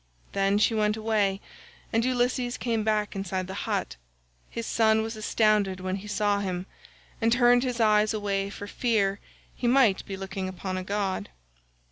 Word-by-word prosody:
Then 195 +1 +2
she 215 +2 +3
went 210 0 +1
away 210 -3 0 0.5
and 225 +1 +3
Ulysses 245 0 0
came 230 -3 -1
back 210 -1 0
inside 190 -1 -2
the 190 - -7 0.2
hut. - - -2 0.5
His 230 - -5
son 220 -1 +3
was 225 +1 -4
astounded 215 -3 +1
when 185 +1 -2
he 205 +2 -9
saw 205 0 +1
him, 185 -2 -3 0.6
and 225 0 +3
turned 245 0 +5
his 250 -2 -2
eyes 215 -1 +4
away 200 -2 -1
for 205 0 -7
fear 205 -3 0 0.3
he 245 - -2
might 240 -6 +4
be 195 - -5
looking 190 0 -4
upon 185 0 -5
a 185 - -3
god. 195 - -2
210 Hz, 165 wpm, -27 LUFS, 195-225 Hz, 0.6 s, turned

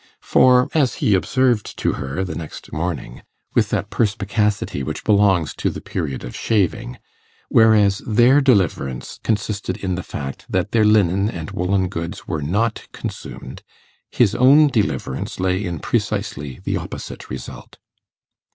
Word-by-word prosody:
For, 125 0 +5
as 140 -7 +2
he 105 - +1
observed 120 +3 +1
to - - +1
her 70 +5 -3
the 95 - -4
next 80 -2 -8
morning, 75 -7 -4 0.3
with - - +2
that - - -2
perspicacity 105 -5 0
which 65 - -4
belongs 100 -7 +3
to - - 0
the - - -6
period 70 - -4
of 60 - -7
shaving, 110 +4 0 0.5
whereas 105 -3 +5
their 120 +5 +5
deliverance 95 - 0
consisted 105 -1 -2
in 95 -2 -2
the 90 - -2
fact 70 -5 -7
that - - -1
their 110 -2 +3
linen 100 -1 +3
and 85 -6 -6
woollen 95 +1 0
goods 85 -1 -6
were 80 -4 -2
not 105 +10 -1
consumed, - - -7 0.5
his 115 -6 +2
own 145 +4 +6
deliverance 100 - -2
lay 95 +1 0
in 85 -4 -3
precisely 70 0 -2
the - - -1
opposite - - -7
result. 65 0 -8
100 Hz, 140 wpm, -21 LUFS, 85-110 Hz, 0.5 s, own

